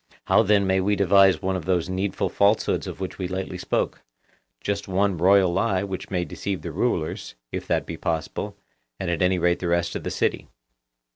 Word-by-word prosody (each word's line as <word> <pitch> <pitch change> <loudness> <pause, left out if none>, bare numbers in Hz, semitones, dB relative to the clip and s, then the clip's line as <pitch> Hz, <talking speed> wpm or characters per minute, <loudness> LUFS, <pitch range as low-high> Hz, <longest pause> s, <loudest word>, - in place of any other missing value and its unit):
How 110 - +5
then 105 -2 +3
may 95 0 +2
we 105 +2 +2
devise 100 0 +4
one 95 0 0
of 90 - -4
those 90 -2 +1
needful 95 +1 -1
falsehoods 100 +2 +2
of - - -7
which 95 0 -5
we 90 - -2
lately 95 +1 -4
spoke—just 100 +10 -4
one 95 0 +1
royal 95 +1 +4
lie 95 0 +1
which 95 -2 -5
may 90 -2 -1
deceive 95 0 -4
the 85 - -4
rulers, 85 -3 -2 0.2
if - - -5
that - - 0
be 85 - -6
possible, 80 -1 -3 0.4
and 90 -2 -2
at 85 - -1
any 90 0 +3
rate 85 0 +2
the 90 - -3
rest 85 0 0
of - - -3
the - - -2
city? - - -1
95 Hz, 195 wpm, -24 LUFS, 90-100 Hz, 0.4 s, How